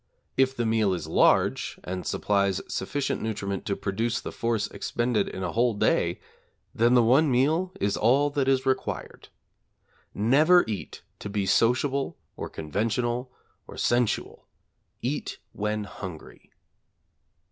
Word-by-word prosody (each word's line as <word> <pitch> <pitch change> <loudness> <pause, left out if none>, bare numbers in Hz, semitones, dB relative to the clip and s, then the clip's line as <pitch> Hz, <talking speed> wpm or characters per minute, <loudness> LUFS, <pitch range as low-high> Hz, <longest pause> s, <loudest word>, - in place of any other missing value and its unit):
If 135 0 +2
the 120 - -1
meal 110 -4 +2
is 85 - -5
large - - +2
and 90 +1 -5
supplies 100 -2 +1
sufficient 145 -1 -2
nutriment 100 -3 -3
to 100 - 0
produce 110 +5 -1
the - - -6
force 115 -2 -1
expended 120 -4 -1
in 95 - -6
a - - -2
whole 120 0 +2
day, - - +1 0.5
then 120 +2 +3
the 120 - +6
one 135 +7 +4
meal 155 +9 +2
is 100 0 +1
all 135 +6 +3
that 140 -2 0
is 135 0 +2
required. 130 -1 -3 0.9
Never 150 - +5
eat 105 -4 -6 0.2
to - - -6
be 100 -1 -1
sociable, 130 +7 +1 0.2
or - - -5
conventional, 120 - -2 0.4
or - - -11
sensual; 120 -2 0 0.6
eat - - -3 0.2
when 105 +1 -2
hungry. 95 -5 -9
115 Hz, 135 wpm, -26 LUFS, 100-130 Hz, 0.9 s, the